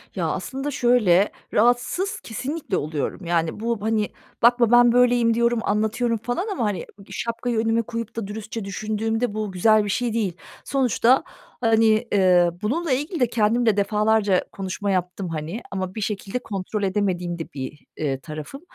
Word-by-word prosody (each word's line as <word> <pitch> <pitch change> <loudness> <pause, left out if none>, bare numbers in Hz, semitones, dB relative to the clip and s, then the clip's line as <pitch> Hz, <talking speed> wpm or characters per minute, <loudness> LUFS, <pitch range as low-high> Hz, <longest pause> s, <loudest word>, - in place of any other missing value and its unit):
Ya, - - -1
aslında 270 +2 -3
şöyle; 220 -7 +3 0.2
rahatsız 245 - +2
kesinlikle 265 - -3
oluyorum. 155 +4 -3
Yani, 170 +2 0
bu, 230 -2 -2
hani, 215 -1 0 0.3
bakma, 240 -1 +5
"Ben 240 0 +7
böyleyim." 245 -1 +4
diyorum, 235 0 +2
anlatıyorum 220 +3 0
falan 245 - -3
ama, 240 - -1
hani, 205 -3 0 0.2
ııı, 195 - -13
şapkayı 235 0 -2
önüme 225 +1 +2
koyup 230 0 -6
da 220 -4 -3
dürüstçe 215 0 -6
düşündüğümde 220 +3 -2
bu 215 -2 -3
güzel 215 +3 +4
bir 205 - -3
şey 240 +2 0
değil. 210 -6 0 0.3
Sonuçta, 260 +1 +3 0.4
hani, 225 0 +3
eee, 180 -3 +4
bununla 300 +9 -1
ilgili 295 +7 -1
de 245 - +3
kendim 230 +1 +1
de 210 -2 +3
defalarca 210 -1 +2
konuşma 195 +1 -3
yaptım, 180 0 -2
hani. 165 +7 -4
Ama 190 0 -4
bir 215 - -4
şekilde 205 +3 -3
kontrol 200 0 -4
edemediğim 180 -3 -1
de 165 - -7
bir, 140 +2 -7
eee, 135 -3 -1
tarafım. 155 - -8
220 Hz, 160 wpm, -23 LUFS, 195-240 Hz, 0.4 s, Ben